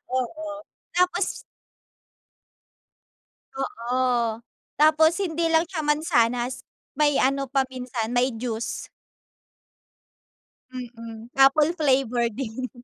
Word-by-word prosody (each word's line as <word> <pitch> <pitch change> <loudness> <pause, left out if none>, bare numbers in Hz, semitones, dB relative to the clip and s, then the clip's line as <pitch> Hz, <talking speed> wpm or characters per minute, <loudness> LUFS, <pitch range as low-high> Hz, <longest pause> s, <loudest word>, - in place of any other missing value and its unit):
Oo. 300 +5 -3 0.3
Tapos 360 +1 +1 2.2
Oo. 245 -3 0 0.4
Tapos 310 +1 +6
hindi 335 -3 0
lang 325 +1 +3
siya 345 -4 -3
mansanas, 250 -5 +1 0.3
may 295 -2 +3
ano 275 0 +1
pa 270 0 +2
minsan 250 -3 -4
may 250 +1 +2
juice. 230 -1 -4 1.8
Mm, 230 -2 -9
Apple 285 +4 +5
flavor 260 -6 +1
din 255 +2 -5
260 Hz, 85 wpm, -25 LUFS, 240-305 Hz, 2.2 s, Tapos